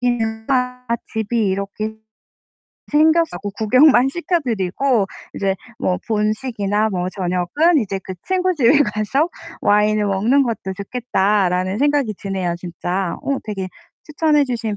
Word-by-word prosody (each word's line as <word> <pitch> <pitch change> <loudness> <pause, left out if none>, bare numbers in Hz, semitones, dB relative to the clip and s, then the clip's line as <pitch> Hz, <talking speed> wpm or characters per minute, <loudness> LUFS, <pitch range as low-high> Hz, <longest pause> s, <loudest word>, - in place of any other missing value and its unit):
먹기가 245 +2 -1 0.3
집이 220 0 0
이렇게 200 +3 -3 1.0
생겨서 315 - +3
구 205 +2 -5
구경만 255 +5 +5
시켜 345 +4 -1
드리고 225 - 0 0.3
이제 195 -1 0 0.2
뭐 180 - 0
'본식이나 215 -1 0
뭐 180 -1 -2
저녁은 185 - +1
이제 195 -2 -4
그 190 - -7
친구 370 0 +1
집에 280 -1 +4
가서 270 +7 0 0.3
와인을 210 0 +3
먹는 220 +8 +3
것도 225 -5 -3
좋겠다.'라는 195 -3 0
생각이 285 -6 +1
드네요, 190 -3 -2
진짜. 175 +1 -3
어 275 -1 -1
되게 195 -3 -4 0.4
'추천해 305 -1 +2
주신 230 -5 -3
220 Hz, 275 characters per minute, -20 LUFS, 195-265 Hz, 1.0 s, 구경만